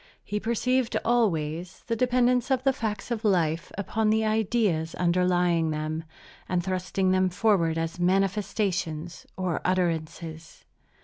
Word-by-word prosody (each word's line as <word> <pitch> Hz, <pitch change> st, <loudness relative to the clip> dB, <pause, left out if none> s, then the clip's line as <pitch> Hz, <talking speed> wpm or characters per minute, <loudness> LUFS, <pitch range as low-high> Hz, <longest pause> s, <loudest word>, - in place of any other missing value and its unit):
He 210 Hz, +1 st, -3 dB
perceived, 245 Hz, +2 st, 0 dB
always, 175 Hz, -7 st, 0 dB
the 230 Hz, -, -1 dB
dependence 250 Hz, 0 st, +2 dB
of 260 Hz, -1 st, +1 dB
the 270 Hz, -1 st, +3 dB
facts 220 Hz, -1 st, -4 dB
of 230 Hz, -1 st, -2 dB
life 170 Hz, -6 st, +1 dB
upon 215 Hz, +2 st, 0 dB
the 220 Hz, 0 st, +2 dB
ideas 215 Hz, -7 st, +1 dB
underlying 175 Hz, -2 st, +2 dB
them, 155 Hz, +1 st, -3 dB, 0.4 s
and 180 Hz, -1 st, 0 dB
thrusting 185 Hz, 0 st, 0 dB
them 185 Hz, 0 st, +3 dB
forward 180 Hz, -4 st, +2 dB
as 165 Hz, +1 st, -3 dB
manifestations 185 Hz, -3 st, -1 dB
or 185 Hz, -3 st, -1 dB
utterances. 165 Hz, -2 st, -2 dB
185 Hz, 125 wpm, -27 LUFS, 165-220 Hz, 0.4 s, the